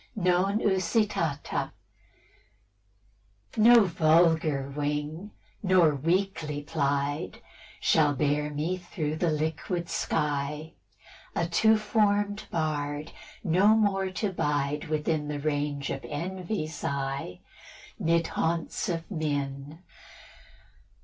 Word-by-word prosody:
XX. 200 Hz, -, -3 dB
NON 185 Hz, +3 st, +3 dB
USITATA. 190 Hz, -6 st, 0 dB, 1.8 s
No 230 Hz, +1 st, +7 dB
vulgar 160 Hz, -4 st, +3 dB
wing, 150 Hz, +5 st, -3 dB, 0.3 s
nor 185 Hz, -5 st, +4 dB
weakly 160 Hz, -1 st, -1 dB
plied, 145 Hz, -1 st, -1 dB, 0.4 s
Shall 150 Hz, -3 st, +3 dB
bear 150 Hz, +1 st, +1 dB
me 155 Hz, +5 st, -2 dB
through 155 Hz, -3 st, -3 dB
the 170 Hz, +1 st, +1 dB
liquid 160 Hz, +3 st, -2 dB
sky; 150 Hz, +1 st, -2 dB, 0.6 s
A 170 Hz, -, +1 dB
two 220 Hz, +6 st, +4 dB
form'd 205 Hz, -1 st, +1 dB
bard, 150 Hz, -1 st, -2 dB, 0.3 s
no 185 Hz, +2 st, +3 dB
more 195 Hz, -3 st, +1 dB
to 195 Hz, +2 st, -2 dB
bide 150 Hz, -2 st, -1 dB
Within 155 Hz, 0 st, -1 dB
the 145 Hz, -1 st, -3 dB
range 145 Hz, -1 st, -1 dB
of 135 Hz, -, -4 dB
envy's 170 Hz, 0 st, -4 dB
eye 135 Hz, -10 st, -3 dB, 0.6 s
'Mid 165 Hz, 0 st, +2 dB
haunts 165 Hz, +2 st, -1 dB
of 165 Hz, +2 st, -3 dB
men. 145 Hz, -1 st, -3 dB
160 Hz, 95 wpm, -28 LUFS, 145-185 Hz, 1.8 s, No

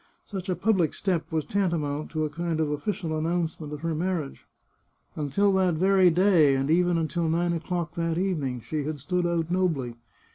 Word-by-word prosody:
Such 190 Hz, -2 st, -6 dB
a 180 Hz, -, +1 dB
public 190 Hz, -7 st, +1 dB
step 180 Hz, -5 st, -1 dB
was 160 Hz, -2 st, -1 dB
tantamount 160 Hz, -7 st, -1 dB
to 155 Hz, -1 st, -1 dB
a -, -, -2 dB
kind 165 Hz, 0 st, -2 dB
of 155 Hz, -2 st, 0 dB
official 160 Hz, +2 st, -2 dB
announcement 160 Hz, -1 st, -2 dB
of 150 Hz, -1 st, -6 dB
her 165 Hz, 0 st, -1 dB
marriage. 165 Hz, -3 st, -3 dB, 0.7 s
Until 160 Hz, +7 st, +1 dB
that 185 Hz, -3 st, +2 dB
very 190 Hz, +2 st, +5 dB
day, 170 Hz, -5 st, +4 dB
and 135 Hz, +3 st, 0 dB
even 175 Hz, +1 st, +3 dB
until 165 Hz, 0 st, -1 dB
nine 170 Hz, +1 st, +1 dB
o'clock 170 Hz, -1 st, -3 dB
that 165 Hz, -1 st, -1 dB
evening, 150 Hz, -10 st, -1 dB
she 150 Hz, +5 st, -3 dB
had 150 Hz, -1 st, -4 dB
stood 180 Hz, +5 st, -1 dB
out 170 Hz, -1 st, -1 dB
nobly. 165 Hz, -10 st, 0 dB
165 Hz, 180 wpm, -26 LUFS, 155-180 Hz, 0.7 s, very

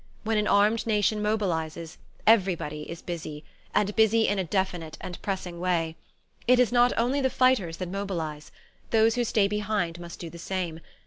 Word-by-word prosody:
When 220 Hz, -1 st, +1 dB
an 210 Hz, -, 0 dB
armed 210 Hz, +3 st, +3 dB
nation 210 Hz, 0 st, +2 dB
mobilizes, 170 Hz, -6 st, -2 dB, 0.3 s
everybody 180 Hz, -8 st, +2 dB
is 165 Hz, +1 st, -7 dB
busy, 155 Hz, -3 st, -6 dB, 0.3 s
and 210 Hz, 0 st, +1 dB
busy 220 Hz, 0 st, +4 dB
in 205 Hz, -1 st, +1 dB
a -, -, +1 dB
definite 180 Hz, -3 st, -2 dB
and 180 Hz, -, -7 dB
pressing 185 Hz, -3 st, -4 dB
way. 170 Hz, -3 st, 0 dB, 0.5 s
It 250 Hz, +1 st, +6 dB
is 250 Hz, -2 st, +4 dB
not 245 Hz, 0 st, +5 dB
only 255 Hz, +5 st, +1 dB
the 265 Hz, -, +2 dB
fighters 250 Hz, -11 st, +2 dB
that 185 Hz, -, -4 dB
mobilize: 170 Hz, -6 st, -4 dB, 0.4 s
those 225 Hz, 0 st, +4 dB
who 245 Hz, 0 st, 0 dB
stay 215 Hz, -3 st, +2 dB
behind 205 Hz, -5 st, -1 dB
must 170 Hz, -1 st, -8 dB
do 170 Hz, -2 st, -7 dB
the 170 Hz, -, -10 dB
same. 175 Hz, -3 st, -3 dB
195 Hz, 175 wpm, -27 LUFS, 170-220 Hz, 0.5 s, It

